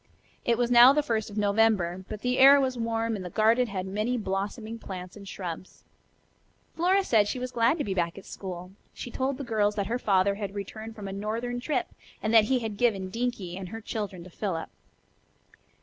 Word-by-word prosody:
It 235 Hz, -1 st, +2 dB
was 245 Hz, 0 st, 0 dB
now 245 Hz, +2 st, +9 dB
the 300 Hz, +1 st, +2 dB
first 220 Hz, -6 st, -1 dB
of 205 Hz, -, -9 dB
November, 200 Hz, -4 st, +2 dB
but 215 Hz, -1 st, -6 dB
the 250 Hz, +1 st, 0 dB
air 275 Hz, +2 st, +9 dB
was 260 Hz, -2 st, 0 dB
warm 230 Hz, -1 st, -1 dB
and 195 Hz, -, -5 dB
the 180 Hz, -, -6 dB
garden 225 Hz, +6 st, +3 dB
had 190 Hz, -3 st, -4 dB
many 215 Hz, +6 st, -1 dB
blossoming 215 Hz, +3 st, -3 dB
plants 185 Hz, -3 st, -8 dB
and 200 Hz, -2 st, -11 dB
shrubs. 180 Hz, -1 st, -7 dB, 0.9 s
Flora 370 Hz, +4 st, +3 dB
said 230 Hz, -, +3 dB
that 205 Hz, -, +3 dB
she 255 Hz, -, -2 dB
was 250 Hz, 0 st, -4 dB
glad 235 Hz, +7 st, +2 dB
to 295 Hz, -, -1 dB
be 195 Hz, -, -2 dB
back 170 Hz, -1 st, -1 dB
at 195 Hz, -, -10 dB
school. 180 Hz, -1 st, -7 dB, 0.2 s
She 245 Hz, -, -7 dB
told 265 Hz, +2 st, -1 dB
the 280 Hz, -, -5 dB
girls 210 Hz, -4 st, +1 dB
that 200 Hz, -2 st, -1 dB
her 235 Hz, +5 st, -2 dB
father 200 Hz, -3 st, +3 dB
had 200 Hz, -1 st, -5 dB
returned 220 Hz, +3 st, -7 dB
from 205 Hz, -3 st, -7 dB
a 195 Hz, -, -5 dB
northern 225 Hz, +5 st, -3 dB
trip 260 Hz, 0 st, -1 dB, 0.3 s
and 215 Hz, +1 st, -1 dB
that 220 Hz, -2 st, +7 dB
he 260 Hz, +4 st, +2 dB
had 220 Hz, -4 st, -4 dB
given 200 Hz, -5 st, +1 dB
Dinkie 230 Hz, -6 st, -3 dB
and 185 Hz, -1 st, -6 dB
her 225 Hz, -, -6 dB
children 205 Hz, -5 st, -5 dB
to 185 Hz, -, -13 dB
Philip. 170 Hz, -4 st, -3 dB
215 Hz, 210 wpm, -27 LUFS, 195-240 Hz, 0.9 s, now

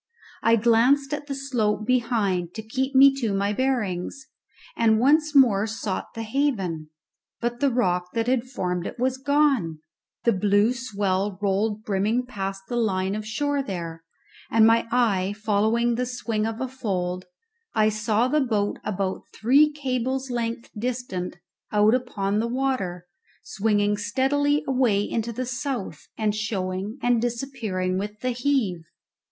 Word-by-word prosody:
I 230 Hz, 0 st, +5 dB
glanced 240 Hz, +5 st, +3 dB
at 295 Hz, -1 st, -4 dB
the 275 Hz, -, -3 dB
slope 235 Hz, -6 st, -1 dB
behind 220 Hz, -8 st, 0 dB
to 220 Hz, -, -5 dB
keep 265 Hz, +5 st, -2 dB
me 275 Hz, +1 st, +8 dB
to 215 Hz, -4 st, 0 dB
my 200 Hz, +1 st, 0 dB
bearings, 240 Hz, -2 st, -1 dB, 0.5 s
and 220 Hz, -1 st, +3 dB
once 300 Hz, +4 st, +3 dB
more 225 Hz, -6 st, +5 dB
sought 215 Hz, -3 st, -4 dB
the 225 Hz, -, -4 dB
haven; 215 Hz, -, -1 dB, 0.5 s
but 240 Hz, 0 st, -2 dB
the 280 Hz, -, +3 dB
rock 180 Hz, -8 st, 0 dB
that 230 Hz, -1 st, +1 dB
had 250 Hz, 0 st, +1 dB
formed 180 Hz, -8 st, -3 dB
it -, -, -8 dB
was 260 Hz, +1 st, 0 dB
gone, 275 Hz, -, +2 dB, 0.5 s
the 235 Hz, -, +3 dB
blue 205 Hz, +4 st, +3 dB
swell 200 Hz, -5 st, -1 dB
rolled 205 Hz, +2 st, 0 dB
brimming 215 Hz, +5 st, 0 dB
past 195 Hz, -5 st, -5 dB
the 240 Hz, -, -2 dB
line 190 Hz, -4 st, 0 dB
of 215 Hz, 0 st, -4 dB
shore 285 Hz, +6 st, 0 dB
there, 170 Hz, -8 st, -6 dB, 0.5 s
and 225 Hz, -1 st, +5 dB
my 230 Hz, +1 st, +4 dB
eye 205 Hz, -5 st, +1 dB
following 220 Hz, +3 st, +2 dB
the 250 Hz, +2 st, -1 dB
swing 230 Hz, -3 st, -2 dB
of 225 Hz, 0 st, -4 dB
a 260 Hz, -, -2 dB
fold, 185 Hz, -8 st, -3 dB, 0.5 s
I 215 Hz, -1 st, +4 dB
saw 215 Hz, +2 st, +1 dB
the 300 Hz, +3 st, +2 dB
boat 215 Hz, -6 st, 0 dB
about 195 Hz, -2 st, -2 dB, 0.2 s
three 280 Hz, +7 st, +5 dB
cables 260 Hz, -2 st, -2 dB
length 235 Hz, -1 st, -3 dB
distant 225 Hz, -6 st, -3 dB, 0.4 s
out 210 Hz, +1 st, +4 dB
upon 210 Hz, -5 st, 0 dB
the 230 Hz, -, 0 dB
water, 235 Hz, -9 st, -2 dB, 0.4 s
swinging 205 Hz, -1 st, +1 dB
steadily 280 Hz, +7 st, +1 dB
away 250 Hz, -7 st, +2 dB
into 230 Hz, 0 st, -2 dB
the 255 Hz, +3 st, -3 dB
south, 255 Hz, -, -4 dB
and 215 Hz, -2 st, +1 dB
showing 205 Hz, 0 st, -3 dB
and 245 Hz, -2 st, +3 dB
disappearing 230 Hz, -7 st, -2 dB
with 210 Hz, +2 st, -6 dB
the 255 Hz, -, 0 dB
heave. 240 Hz, -10 st, 0 dB
225 Hz, 150 wpm, -25 LUFS, 200-255 Hz, 0.5 s, me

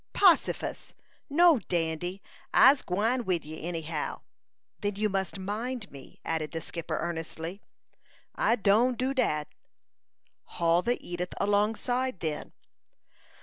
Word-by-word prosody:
"Possifus! 375 Hz, -4 st, +3 dB, 0.4 s
No, 330 Hz, -1 st, +6 dB
Dandy; 175 Hz, +1 st, -2 dB, 0.3 s
I'se 275 Hz, 0 st, +7 dB
gwine 225 Hz, +7 st, 0 dB
wid 180 Hz, -7 st, -1 dB
you, 155 Hz, +1 st, -8 dB
any 165 Hz, 0 st, -3 dB
how." 155 Hz, -1 st, -4 dB, 0.6 s
"Then 205 Hz, -1 st, -2 dB
you 210 Hz, +1 st, +1 dB
must 195 Hz, 0 st, -1 dB
mind 215 Hz, +3 st, -4 dB
me!" 135 Hz, -2 st, -13 dB
added 160 Hz, -1 st, -2 dB
the 165 Hz, -, -2 dB
skipper, 165 Hz, +1 st, -4 dB
earnestly. 165 Hz, +2 st, -4 dB, 0.7 s
"I 230 Hz, -, +2 dB
done 225 Hz, +4 st, +3 dB
do 260 Hz, +3 st, -1 dB
dat." 155 Hz, -, +1 dB, 1.1 s
"Haul 170 Hz, 0 st, +3 dB
the 240 Hz, +5 st, 0 dB
Edith 175 Hz, +1 st, -4 dB
alongside, 215 Hz, +3 st, +1 dB
then." 155 Hz, -2 st, -3 dB
195 Hz, 120 wpm, -29 LUFS, 165-240 Hz, 1.1 s, I'se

